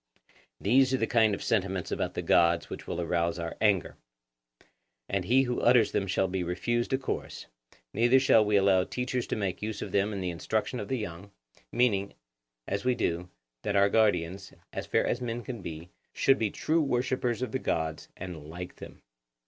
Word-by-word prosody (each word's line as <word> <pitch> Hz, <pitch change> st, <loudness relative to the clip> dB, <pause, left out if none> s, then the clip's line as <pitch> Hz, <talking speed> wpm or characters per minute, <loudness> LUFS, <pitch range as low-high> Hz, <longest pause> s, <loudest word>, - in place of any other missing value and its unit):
These 130 Hz, +5 st, +4 dB
are -, -, 0 dB
the 115 Hz, -, +1 dB
kind 110 Hz, -3 st, +3 dB
of -, -, -8 dB
sentiments 95 Hz, -4 st, -1 dB
about -, -, -2 dB
the -, -, -2 dB
gods 85 Hz, 0 st, +3 dB
which -, -, -7 dB
will -, -, -3 dB
arouse 85 Hz, 0 st, 0 dB
our 85 Hz, -1 st, -4 dB
anger; 100 Hz, -6 st, +2 dB, 1.1 s
and 100 Hz, -2 st, -1 dB
he 130 Hz, +6 st, +4 dB
who 125 Hz, -2 st, -2 dB
utters 120 Hz, -2 st, +5 dB
them 100 Hz, -, 0 dB
shall 95 Hz, 0 st, +1 dB
be 95 Hz, 0 st, -2 dB
refused 120 Hz, +7 st, -1 dB
a 130 Hz, -, +3 dB
chorus; 130 Hz, -, -5 dB, 0.5 s
neither 120 Hz, +4 st, +4 dB
shall 120 Hz, -4 st, +5 dB
we 105 Hz, 0 st, +1 dB
allow 95 Hz, -2 st, +4 dB
teachers 125 Hz, +3 st, -3 dB
to -, -, -1 dB
make 100 Hz, -4 st, -3 dB
use 110 Hz, -1 st, -3 dB
of 100 Hz, -, -5 dB
them 100 Hz, +2 st, +1 dB
in 100 Hz, -, -4 dB
the 90 Hz, -1 st, -2 dB
instruction 110 Hz, +8 st, -2 dB
of 105 Hz, -, -5 dB
the 130 Hz, -, -1 dB
young, 100 Hz, -3 st, -6 dB, 0.4 s
meaning, 100 Hz, -5 st, +1 dB, 0.5 s
as 100 Hz, +1 st, -2 dB
we 125 Hz, 0 st, +2 dB
do, 85 Hz, -2 st, -2 dB, 0.3 s
that 100 Hz, -, -2 dB
our 100 Hz, 0 st, +5 dB
guardians, 95 Hz, -3 st, +1 dB, 0.2 s
as -, -, -5 dB
far -, -, +2 dB
as 125 Hz, -, -1 dB
men 120 Hz, -1 st, -3 dB
can 120 Hz, -5 st, -6 dB
be, 85 Hz, 0 st, -8 dB, 0.2 s
should 135 Hz, 0 st, +3 dB
be 110 Hz, -, +1 dB
true 160 Hz, +10 st, 0 dB
worshippers 125 Hz, -3 st, 0 dB
of 130 Hz, -, -3 dB
the 130 Hz, -, -1 dB
gods 80 Hz, -6 st, -2 dB
and 85 Hz, -5 st, -8 dB
like 90 Hz, +2 st, -8 dB
them. -, -, -12 dB
100 Hz, 195 wpm, -29 LUFS, 90-120 Hz, 1.1 s, utters